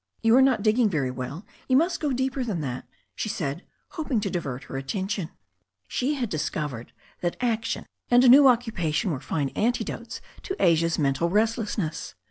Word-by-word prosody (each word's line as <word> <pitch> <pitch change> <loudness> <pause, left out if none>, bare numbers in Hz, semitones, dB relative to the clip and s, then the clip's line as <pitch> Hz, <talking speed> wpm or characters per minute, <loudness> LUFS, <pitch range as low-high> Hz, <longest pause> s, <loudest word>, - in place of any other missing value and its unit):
You 225 +1 +5
are 265 - +7
not 260 -6 +3
digging 220 +1 +3
very 140 -8 -1
well. 135 +8 -6 0.2
You 260 - +4
must 335 +3 +1
go 295 -3 -1
deeper 260 +1 -1
than 210 -8 -2
that/' 130 -4 -4 0.3
she 215 - -3
said, 165 -7 -3 0.3
hoping 295 -8 -1
to - - -2
divert 140 -7 -4
her - - -9
attention. 190 +6 -3 0.6
She 275 - -1
had 250 -4 -1
discovered 150 - -3 0.3
that 175 -1 -2
action 230 -2 -1 0.2
and 245 +1 +6
a - - +6
new 275 +3 +9
occupatioB 220 - +2
were 140 - -2
fine 140 0 -2
antidotes 240 - -2 0.2
to 385 - -4
Asia's 165 -1 +3
mental 145 +3 +1
restlessness. 210 -4 -1
205 Hz, 170 wpm, -26 LUFS, 155-245 Hz, 0.6 s, new